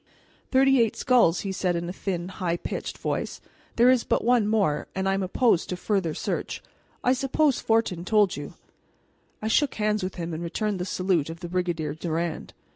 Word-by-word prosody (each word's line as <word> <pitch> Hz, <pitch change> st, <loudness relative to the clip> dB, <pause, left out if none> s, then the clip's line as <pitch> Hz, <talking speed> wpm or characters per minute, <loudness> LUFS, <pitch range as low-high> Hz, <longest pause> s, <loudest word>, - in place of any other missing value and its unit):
"Thirty 270 Hz, -1 st, +5 dB
eight 225 Hz, -2 st, +1 dB
skulls," 240 Hz, -10 st, +3 dB
he 195 Hz, -, -3 dB
said 180 Hz, -2 st, 0 dB
in 170 Hz, 0 st, -2 dB
his 180 Hz, +2 st, -5 dB
thin, 180 Hz, -3 st, -3 dB
high 175 Hz, -2 st, -2 dB
pitched -, -, -5 dB
voice; -, -, -3 dB, 0.4 s
"there 240 Hz, +2 st, +6 dB
is 255 Hz, -2 st, +3 dB
but -, -, 0 dB
one 235 Hz, -2 st, +3 dB
more, 200 Hz, -9 st, +1 dB
and 190 Hz, 0 st, -1 dB
I 195 Hz, -, +2 dB
am 195 Hz, -, 0 dB
opposed 190 Hz, 0 st, +2 dB
to 180 Hz, -, -3 dB
further 185 Hz, -5 st, -1 dB
search. -, -, -3 dB, 0.4 s
I 250 Hz, -, +4 dB
suppose 270 Hz, +2 st, +1 dB
Fortin 225 Hz, -6 st, +1 dB
told 205 Hz, 0 st, +3 dB
you?" -, -, -7 dB, 0.9 s
I -, -, 0 dB
shook 280 Hz, +5 st, +2 dB
hands 210 Hz, 0 st, 0 dB
with 185 Hz, 0 st, -4 dB
him, 170 Hz, -1 st, -4 dB
and 160 Hz, -, -4 dB
returned 195 Hz, +3 st, -2 dB
the 180 Hz, -, -2 dB
salute 180 Hz, -5 st, 0 dB
of 165 Hz, +1 st, -8 dB
the 175 Hz, -, -6 dB
Brigadier 170 Hz, -4 st, -1 dB
Durand. 165 Hz, +1 st, -3 dB
190 Hz, 195 wpm, -26 LUFS, 175-225 Hz, 0.9 s, there